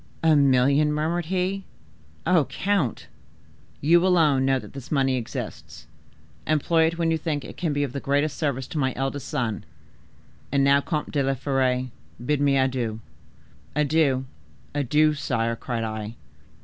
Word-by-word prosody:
"A 160 -1 +5
million!" 140 +2 +4
murmured 160 +3 -1
he, 190 +2 -1 0.6
"Oh, 170 -6 +4
count!" 190 - -1 0.8
"'You 170 +4 +5
alone 155 -8 +3
know 135 0 +3
that - - -9
this 135 -2 -9
money 135 -3 +2
exists: 120 -3 -6 0.6
employ 160 +2 +3
it 165 +1 -3
when 165 -1 +1
you 160 - 0
think 150 -3 -3
it - - -9
can 170 -3 -2
be 145 0 0
of 135 -3 -4
the 140 - -3
greatest 145 +2 0
service 140 -4 -2
to 155 - -3
my 130 -2 0
eldest 135 0 -3
son. 120 -9 -2 0.9
And 140 -1 +2
now, 140 +1 +5
Comte 150 0 -3
de 145 - +1
la 135 0 +1
Fere, 130 -2 0 0.3
bid 150 +1 +1
me 140 -1 +3
adieu!' 125 -4 0 0.8
"'Adieu, 145 -3 +2 0.5
adieu, 150 +2 +3
sire!' 115 -5 -1
cried 115 0 -4
I." 110 0 -5
140 Hz, 155 wpm, -25 LUFS, 130-155 Hz, 0.9 s, A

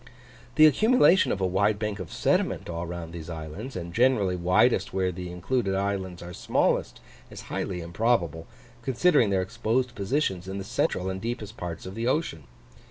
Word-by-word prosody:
The 155 - +8
accumulation 215 - +5
of - - -1
a - - +2
wide 100 +3 +2
bank 105 -1 -3
of 95 - -7
sediment - - 0
all 85 0 -4
round 85 -1 -6
these 85 -1 -7
islands, 80 - -7
and 85 -2 -6
generally 115 -6 +3
widest 90 +1 +2
where 95 -1 +1
the 90 0 -6
included 95 +3 -1
islands 95 -3 -2
are 90 0 -8
smallest, - - 0 0.3
is - - -9
highly 90 -2 -3
improbable, 85 -3 0 0.3
considering 130 - +3
their 95 -1 +1
exposed 120 +4 -1
positions 100 - -1
in 95 +1 -4
the 100 - -4
central 95 -1 -1
and 95 0 -3
deepest 115 -2 -4
parts 85 -6 -6
of 95 - -7
the 115 +3 -2
ocean. 130 - -1
95 Hz, 170 wpm, -27 LUFS, 90-120 Hz, 0.3 s, The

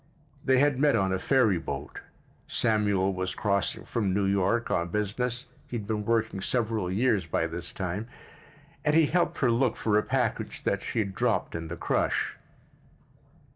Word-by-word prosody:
They 130 -1 +4
had 145 0 +3
met 145 0 +4
on 95 -1 +1
a 95 - 0
ferry 110 -7 +3
boat. 80 - -6 0.5
Samuel 105 -4 +1
was 95 0 -3
crossing 100 -3 -1
from 100 -5 -1
New 100 -1 +2
York 100 +4 +1
on 85 - +1
business 115 +6 -2 0.2
(he 120 - -3
had 105 - -6
been 105 0 -2
working 115 -3 0
several 110 -5 -1
years 105 -3 +1
by 80 - 0
this 85 +1 -5
time) 95 +4 -4 0.8
and 150 0 +2
he 160 -1 +6
helped 170 +4 +1
her 130 -4 +4
look 120 0 +2
for 105 -1 +2
a - - +1
package 125 -1 -2
that - - 0
she - - -5
had 100 -3 0
dropped 120 +2 0
in 80 -1 -4
the 85 +2 -6
crush. - - 0
105 Hz, 175 wpm, -28 LUFS, 95-120 Hz, 0.8 s, he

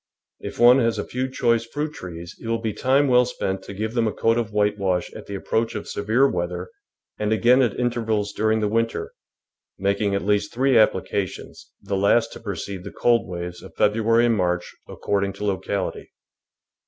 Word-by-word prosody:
If - - -7
one 120 +2 +7
has 115 -2 +1
a - - -2
few 130 +1 -3
choice 115 -3 +1
fruit 150 +6 -4
trees 85 - -8
it - - -8
will 115 0 +1
be 110 -2 -3
time 135 +5 +2
well 125 -1 +5
spent 95 -6 -3
to - - -8
give 110 +3 -3
them 115 -2 +1
a - - 0
coat 115 +2 +1
of 110 -2 -3
whitewash 105 -3 0
at - - -10
the 100 - -5
approach 110 +3 -1
of 105 - -5
severe 110 +7 +2
weather 90 -3 -3 0.5
and 105 0 -1
again 120 +4 +4
at 120 -6 0
intervals 110 -4 -1
during 110 +1 +1
the 105 - +1
winter, 115 +2 -1 0.6
making 100 +1 0
at 100 - -2
least 105 0 +1
three 130 +2 +2
applica 100 -3 +2
tions, - - -12
the 100 - -2
last 115 +4 +2
to - - -9
precede 100 -2 -5
the - - -6
cold 120 -6 +2
waves 90 0 -6
of - - -13
Feb - - +3
ruary 115 +1 +3
and 115 -1 +3
March, 90 -2 -1
according 100 -1 -1
to 100 +1 -6
locality. 95 -1 -3
110 Hz, 195 wpm, -23 LUFS, 100-115 Hz, 0.6 s, one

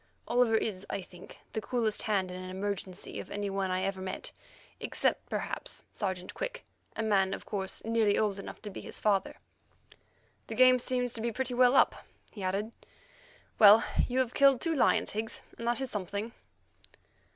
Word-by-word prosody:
Oliver 240 -2 +3
is, 205 -4 -1
I 195 - -3
think, 180 0 -13 0.2
the 220 - -2
coolest 225 -3 0
hand 195 -4 0
in 185 0 -6
an 185 - -7
emergency 190 0 -4
of - - -8
any 205 -1 -3
one 195 -1 -1
I 185 0 0
ever 195 -1 -2
met, 185 - -4 0.5
except, - - -1
perhaps, - - -4
Sergeant 185 -3 -3
Quick, - - -5 0.3
a 225 - -2
man, 195 -3 +2
of - - -11
course, 190 -1 -3
nearly 225 -2 +2
old 205 -2 +1
enough - - -8
to 210 - -6
be - - -7
his - - -8
father. 200 -2 +1 1.1
"The - - -5
game 255 0 +6
seems 250 -1 -1
to 225 - -2
be 235 +1 -1
pretty 255 +2 -2
well 250 +1 +5
up," - - +4 0.3
he 210 - -9
added. 195 +4 -1 0.9
"Well, 215 +1 +9 0.2
you 250 - -2
have 255 -2 +1
killed 275 -2 +5
two 330 - 0
lions, 280 - +3
Higgs, 220 +1 -3 0.2
and 230 - -4
that 240 +2 +3
is 265 - -3
something." 205 +3 -3
210 Hz, 180 wpm, -30 LUFS, 195-240 Hz, 1.1 s, Well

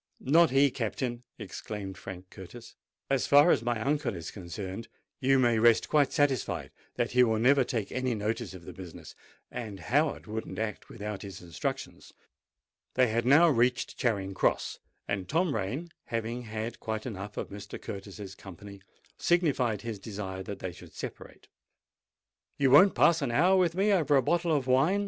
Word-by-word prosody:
"Not 165 +5 +4
he, 135 +1 +4
Captain!" 120 +1 -3 0.2
exclaimed 100 -3 -6
Frank 90 0 -9
Curtis. 110 +6 -11 0.3
"As 135 -1 +1
far 145 +4 +7
as - - +3
my 120 -1 -1
uncle 140 -2 0
is 85 -2 -6
concerned, 95 +2 -6 0.3
you 135 +1 +3
may 120 -3 +3
rest 115 0 +4
quite 145 -3 +3
satisfied 145 -6 0 0.2
that 120 - -1
he 125 0 +5
will 110 -2 +2
never 130 +4 +4
take 115 -4 -3
any 130 -2 -1
notice 110 0 -3
of 85 -2 -12
the - - -8
business: 90 -3 -10 0.4
and 105 -5 -6
Howard 145 - 0
wouldn't 110 +1 -5
act 110 -1 -4
without 105 -2 -6
his 100 -3 -8
instructions." 85 -1 -5 0.8
They 125 -2 +4
had 115 +2 0
now 160 +6 +7
reached 125 -2 +1
Charing 100 -5 -1
Cross; - - 0 0.3
and 95 -3 -3
Tom 165 0 +1
Rain, 125 - -3
having 115 +2 -3
had 110 +1 -5
quite 110 -1 -4
enough 105 -3 -6
of - - -4
Mr. 100 0 -8
Curtis's 100 0 -8
company, 100 +1 -11 0.4
signified 140 - +1
his 115 -3 -5
desire 95 -2 -6
that 100 +1 -6
they 95 - -5
should - - -14
separate. - - -8 1.1
"You 135 -2 +3
won't 185 +8 +7
pass 165 +2 +4
an 140 - 0
hour 175 +11 +4
with 175 -3 +2
me 200 +3 +2
over 155 -6 +3
a 135 - +4
bottle 170 +4 +1
of 145 -4 +1
wine?" 135 +10 +3
120 Hz, 170 wpm, -29 LUFS, 100-140 Hz, 1.1 s, far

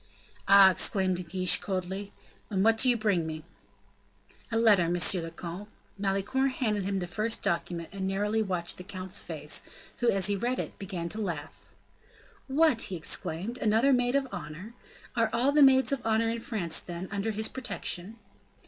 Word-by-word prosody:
"Ah!" 195 -1 +8
exclaimed 185 -1 +1
De - - -4
Guiche, 185 +1 +1
coldly; 190 +1 -4 0.4
"and 190 -2 0
what 225 0 +4
do 255 - +4
you 245 - +3
bring 200 -7 +1
me?" 155 -1 -6 1.1
"A 225 - +1
letter, 205 -7 +4
monsieur 175 +1 +2
le 165 - -5
comte." 175 +5 -8 0.3
Malicorne 200 +7 0
handed 220 -5 -1
him 195 +1 -2
the 180 - -2
first 215 +6 -2
document, 170 -1 -2
and 190 0 -3
narrowly 205 +3 0
watched 180 -4 -2
the 180 - -8
count's 185 -1 -4
face, 150 -3 -3 0.4
who, 240 - +2
as 195 -4 +2
he 205 0 +3
read 240 +6 -1
it, - - -5
began 185 -4 -4
to 215 +6 -5
laugh. 170 -8 -6 0.7
"What!" 280 -3 +3
he 190 - -4
exclaimed, 175 +7 -1
"another 225 +5 +3
maid 245 +1 +2
of 275 -1 +1
honor? 185 +4 -7 0.4
Are 230 -2 +2
all 255 +4 +2
the 295 +1 +4
maids 265 -1 +6
of 275 - -1
honor 225 0 +2
in 230 - -3
France, 190 -8 -2
then, 175 +1 -6
under 200 +2 -2
his 220 0 -1
protection?" 225 -5 -4
200 Hz, 175 wpm, -29 LUFS, 180-225 Hz, 1.1 s, Ah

